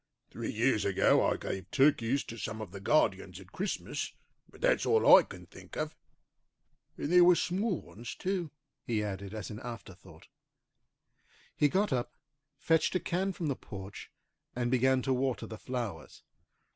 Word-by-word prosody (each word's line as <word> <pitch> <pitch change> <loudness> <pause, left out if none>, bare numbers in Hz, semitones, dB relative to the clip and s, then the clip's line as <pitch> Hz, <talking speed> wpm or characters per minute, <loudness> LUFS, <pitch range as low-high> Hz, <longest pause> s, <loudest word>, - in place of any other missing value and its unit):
Three 115 0 -4
years 115 0 +2
ago 95 -2 +3
I - - +1
gave 95 -1 -5
turkeys 135 -2 +3
to 115 - -9
some 110 +1 -4
of 110 -4 -7
the 100 - -8
guardians 95 - +1
at 95 -1 -15
Christmas, 195 - -3 0.4
but - - -17
that's - - +2
all 445 0 +7
I - - +8
can - - -11
think - - -12
of. - - -3 1.0
And 145 - -3
they 180 0 +7
were 175 0 +7
small 190 +3 0
ones, 115 +3 -9
too," 185 -3 -2 0.3
he 110 -3 -1
added 100 0 -5
as 110 0 -6
an 105 - -7
afterthought. 115 -7 -10 1.3
He 145 - +3
got 195 0 +1
up, 120 -1 -2 0.4
fetched 160 +4 +2
a - - +3
can 185 +3 -1
from 175 -2 -5
the 140 -3 0
porch, 100 -3 -9 0.5
and 120 0 -1
began 130 0 +3
to 135 - +1
water 130 -4 -1
the 110 - -9
flowers. 120 -10 -5
125 Hz, 165 wpm, -31 LUFS, 105-160 Hz, 1.3 s, I